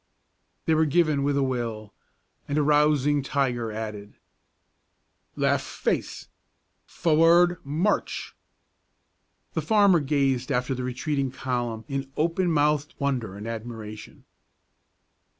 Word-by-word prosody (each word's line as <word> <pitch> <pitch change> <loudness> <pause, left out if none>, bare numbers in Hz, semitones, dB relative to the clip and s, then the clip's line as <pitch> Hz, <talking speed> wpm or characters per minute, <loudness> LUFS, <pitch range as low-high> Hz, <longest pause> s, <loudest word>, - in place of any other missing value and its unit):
_" - - -47
They 160 - +3
were 160 0 +3
given 155 -2 +2
with 140 0 +1
a 140 - +2
will, 115 -5 -3 0.5
and 145 - -1
a 150 - +3
rousing 150 -1 +3
tiger 125 -5 -1
added. 105 -1 -6 1.2
"Left - - +1
face! - - -3 0.6
Forward, 170 +2 +4
march!" 160 +9 -1 1.2
The - - -1
farmer 200 -5 +4
gazed 135 -2 0
after 125 +1 0
the 130 0 -4
retreating 135 +2 -2
column 120 -3 -3
in 135 -1 -4
open 170 +3 +1
mouthed 150 +2 +1
wonder 130 -8 -2
and 105 +2 -7
admiration. 110 -2 -8
140 Hz, 115 wpm, -26 LUFS, 120-155 Hz, 1.2 s, Forward